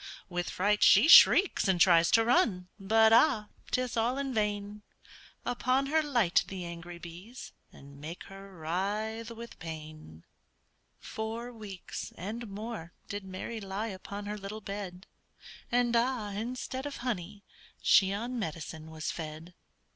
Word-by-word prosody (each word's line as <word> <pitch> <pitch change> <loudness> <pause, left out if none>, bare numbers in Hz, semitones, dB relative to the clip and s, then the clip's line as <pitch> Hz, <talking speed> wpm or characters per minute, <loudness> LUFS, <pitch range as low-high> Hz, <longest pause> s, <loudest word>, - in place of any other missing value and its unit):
With 175 -1 -2
fright 205 +3 +1
she - - +7
shrieks, 360 - +8
and 190 -2 +2
tries 170 -2 +6
to 225 +4 +4
run, 190 -7 +2
But 220 +3 +4
ah! 230 -4 +4 0.2
'tis 255 -1 -1
all 235 +3 +1
in 275 -1 -2
vain; 210 -1 -2 0.6
Upon 255 +2 +1
her 315 +3 +2
light 240 - +2
the 185 -2 -6
angry 170 0 -8
bees, 180 +9 -10 0.2
And 140 0 -14
make 165 +4 -7
her 195 0 -12
writhe 205 +7 -2
with 230 0 -10
pain. 155 - -9 0.7
Four 225 +3 -5
weeks 205 -5 -8
and 220 +6 -5
more 205 -4 -7 0.2
did 205 0 -4
Mary 190 +4 -6
lie 200 +3 -3
Upon 200 +1 -7
her 210 +1 -4
little 200 +2 -6
bed, 195 -2 -6 0.7
And, 240 0 +2
ah! 235 -3 +1
instead 255 +5 -4
of 285 - -6
honey, 205 -3 -4 0.4
she 190 -1 +5
On 235 +5 -3
medicine 160 -4 -5
was 155 -1 -4
fed. 160 +2 -7
205 Hz, 140 wpm, -30 LUFS, 180-235 Hz, 0.7 s, shrieks